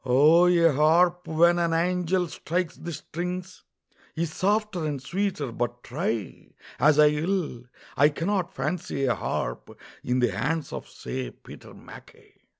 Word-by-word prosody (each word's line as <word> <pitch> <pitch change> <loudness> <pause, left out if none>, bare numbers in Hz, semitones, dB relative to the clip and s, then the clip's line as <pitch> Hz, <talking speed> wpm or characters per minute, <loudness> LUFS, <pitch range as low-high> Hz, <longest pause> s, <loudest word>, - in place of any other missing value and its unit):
O 150 +7 +5
a 170 -2 +5
harp 170 +5 +3
when 170 +2 +4
an 170 -1 +1
angel 180 +1 +1
strikes 170 +2 -3
the 170 - -7
strings 180 +4 -6 0.5
Is 160 -1 -2
softer 205 -2 0
and 145 -2 -3
sweeter, 170 -2 -2
but 120 +1 -3
try 115 - -4 0.3
As 150 0 +5
I 150 0 +7
will, 150 -5 -2 0.3
I 145 +1 +5
cannot 180 +4 -2
fancy 155 -6 -2
a 125 - +2
harp - - -4 0.2
In 125 +1 0
the 120 -3 +2
hands 145 - -2
of, - - -6
say, 65 0 -5
Peter - - -14
MacKay. - - -15
160 Hz, 145 wpm, -26 LUFS, 135-180 Hz, 0.5 s, I